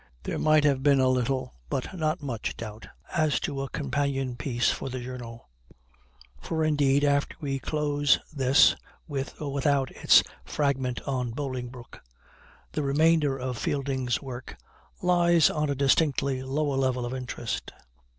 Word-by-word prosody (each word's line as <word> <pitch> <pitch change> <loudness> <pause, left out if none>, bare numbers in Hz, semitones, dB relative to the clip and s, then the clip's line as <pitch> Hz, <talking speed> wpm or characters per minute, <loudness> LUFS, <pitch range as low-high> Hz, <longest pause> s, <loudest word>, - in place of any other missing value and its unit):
There - - -3
might 155 -1 +4
have 140 -3 +2
been 140 0 +4
a 130 0 +4
little, 130 - 0 0.2
but 135 +7 -3
not 155 -2 -1
much, 120 -6 -4
doubt 110 -1 -8 0.3
as 155 -3 +2
to 135 -1 -3
a 135 - -4
companion 140 -3 -1
piece 120 -1 0
for - - -4
the 130 0 -4
Journal; 120 -2 -8 0.9
for 160 -1 -1
indeed, 145 -2 +3
after 140 0 +1
we 135 -2 -2
close 145 0 +2 0.2
this 135 -1 +5 0.3
(with 140 -3 -5
or 145 -2 -4
without 140 -1 +1
its - - +5 0.2
"Fragment 135 -4 -1
on 130 -3 -2
Bolingbroke"), 125 -2 -6 0.7
the - - -2
remainder 150 0 +3
of 125 -2 -4
Fielding's 135 -3 -1
work 130 -2 -8 0.5
lies 175 -3 +4
on 150 -1 -1
a 140 - 0
distinctly 140 -1 +2
lower 140 +1 -1
level 130 -2 0
of 120 - -4
interest. 125 -2 -4
135 Hz, 145 wpm, -27 LUFS, 130-145 Hz, 0.9 s, this